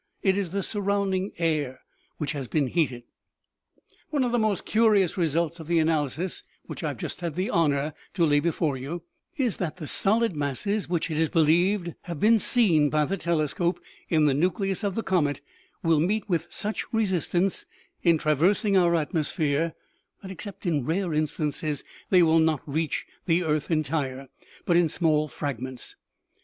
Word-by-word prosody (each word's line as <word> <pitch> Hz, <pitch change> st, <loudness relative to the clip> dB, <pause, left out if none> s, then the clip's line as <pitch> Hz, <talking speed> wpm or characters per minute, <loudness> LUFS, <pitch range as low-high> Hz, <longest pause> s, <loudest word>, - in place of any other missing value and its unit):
It 190 Hz, -1 st, +3 dB
is 195 Hz, -3 st, -1 dB
the 195 Hz, +3 st, -2 dB
surrounding 200 Hz, -2 st, -1 dB
air 150 Hz, -6 st, -1 dB, 0.4 s
which 145 Hz, -2 st, -2 dB
has 140 Hz, -4 st, -4 dB
been 150 Hz, +3 st, +1 dB
heated. 130 Hz, -4 st, -1 dB, 0.5 s
" -, -, -37 dB
One 290 Hz, -4 st, +1 dB
of 245 Hz, -, 0 dB
the 240 Hz, -, +2 dB
most 215 Hz, -4 st, 0 dB
curious 210 Hz, -5 st, +3 dB
results 170 Hz, -1 st, 0 dB
of 160 Hz, -, -9 dB
the 170 Hz, 0 st, +2 dB
analysis 160 Hz, +1 st, 0 dB, 0.2 s
which -, -, -7 dB
I -, -, 0 dB
have -, -, -4 dB
just -, -, -5 dB
had 170 Hz, -4 st, -3 dB
the 190 Hz, +7 st, -1 dB
honor 150 Hz, -2 st, +1 dB, 0.2 s
to 170 Hz, -3 st, +3 dB
lay 145 Hz, -2 st, +4 dB
before 160 Hz, -2 st, 0 dB
you, 155 Hz, +6 st, -6 dB, 0.3 s
is 250 Hz, -7 st, 0 dB
that 175 Hz, -2 st, -3 dB
the 165 Hz, -, -6 dB
solid 215 Hz, +5 st, +1 dB
masses 150 Hz, +9 st, -1 dB
which, 170 Hz, -1 st, -1 dB
it 155 Hz, -, -2 dB
is 160 Hz, -1 st, +2 dB
believed, 175 Hz, +2 st, +2 dB
have 170 Hz, -4 st, -5 dB
been 225 Hz, +1 st, +5 dB
seen 175 Hz, -12 st, +4 dB
;by 150 Hz, 0 st, +2 dB
the 195 Hz, -, -1 dB
tele 170 Hz, -5 st, 0 dB
scope 175 Hz, +4 st, -1 dB, 0.3 s
in 155 Hz, -2 st, +3 dB
the 145 Hz, -, +4 dB
nucleus 190 Hz, -, 0 dB
of 200 Hz, -2 st, -1 dB
the 225 Hz, -, -1 dB
comet, 150 Hz, -6 st, +1 dB, 0.4 s
will 165 Hz, -2 st, +3 dB
meet 200 Hz, +6 st, 0 dB
with 170 Hz, -3 st, 0 dB
such 210 Hz, +1 st, -3 dB
re 225 Hz, -1 st, +2 dB
sistance 185 Hz, 0 st, 0 dB, 0.4 s
in 170 Hz, -2 st, +4 dB
traversing 175 Hz, -, +2 dB
our 175 Hz, -2 st, +4 dB
atmosphere 155 Hz, -1 st, 0 dB, 0.5 s
that, 190 Hz, -, -7 dB
except 195 Hz, +2 st, -8 dB
in 155 Hz, -6 st, +1 dB
rare 170 Hz, +4 st, -1 dB
instances, 150 Hz, -1 st, -1 dB, 0.3 s
they 180 Hz, -2 st, +6 dB
will 165 Hz, 0 st, +4 dB
not 160 Hz, -3 st, +2 dB
reach 155 Hz, +2 st, -1 dB, 0.2 s
the 175 Hz, +1 st, +3 dB
earth 155 Hz, -2 st, -1 dB
entire, 140 Hz, -4 st, -1 dB, 0.4 s
but 175 Hz, -, +2 dB
in 170 Hz, -2 st, +4 dB
small 155 Hz, -2 st, +1 dB
fragments. 130 Hz, -3 st, -5 dB
165 Hz, 175 wpm, -26 LUFS, 150-190 Hz, 0.5 s, they